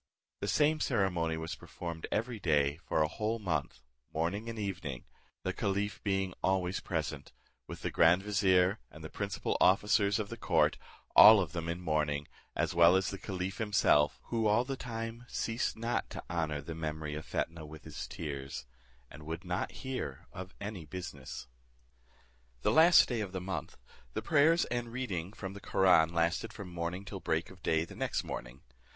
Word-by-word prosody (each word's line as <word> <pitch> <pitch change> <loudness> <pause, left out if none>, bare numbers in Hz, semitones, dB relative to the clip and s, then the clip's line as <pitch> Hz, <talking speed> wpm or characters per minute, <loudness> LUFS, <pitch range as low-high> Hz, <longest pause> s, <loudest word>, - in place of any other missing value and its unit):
The - - -3
same 155 +1 +3
ceremony 90 - +1
was 80 0 -4
performed 85 -2 -6
every 115 +1 -1
day 75 -5 +2
for 80 -2 0
a - - +2
whole 110 +7 -2
month, 80 - -3 0.3
morning 95 +8 -2
and 115 - -6
evening, 90 - -4 0.4
the - - -1
caliph 100 +1 -1
being 95 -2 0
always 95 -1 +1
present, 75 -4 -4 0.3
with - - -8
the - - -1
grand 85 +4 +5
vizier, 95 -1 +3
and 80 - -12
the 80 - -7
principal 100 -1 -2
officers 100 +1 +4
of 105 -3 -3
the - - -6
court, - - +2 0.4
all 110 -1 +11
of 90 -6 -1
them 85 -1 -3
in 85 +1 -2
mourning, 75 -3 0 0.3
as - - 0
well 85 +1 +7
as 95 0 +1
the 100 - -6
caliph 95 -1 -4
himself, 100 -9 +3
who 115 -2 +1
all 110 +4 +3
the 135 +1 -3
time 115 -1 -5
ceased 115 -1 -2
not 115 +2 -1
to - - -7
honour 80 -4 -1
the 80 +3 -6
memory 80 -1 -4
of 75 +1 -5
Fetnah 85 -2 -3
with 80 0 -11
his - - -6
tears, 70 -4 -5 0.5
and - - -11
would 80 +3 -6
not 90 +1 -2
hear 125 - -4
of 95 +1 -8
any 100 -4 -5
business. 75 -7 -7 1.2
The - - +3
last 165 +3 +7
day 120 -3 -1
of 100 -3 -5
the 95 - -2
month, 95 +1 -5 0.4
the - - -2
prayers 165 +2 +4
and 120 -1 -3
reading 100 -9 -3
of 95 -1 -5
the 100 - -10
Koraun 90 -4 +4
lasted 85 +6 0
from 100 -4 -8
morning 85 +2 -4
till 90 - -6
break 80 +3 -1
of 95 -1 -15
day 80 -1 +1
the - - -12
next - - -1
morning. - - -7
90 Hz, 180 wpm, -32 LUFS, 80-105 Hz, 1.2 s, all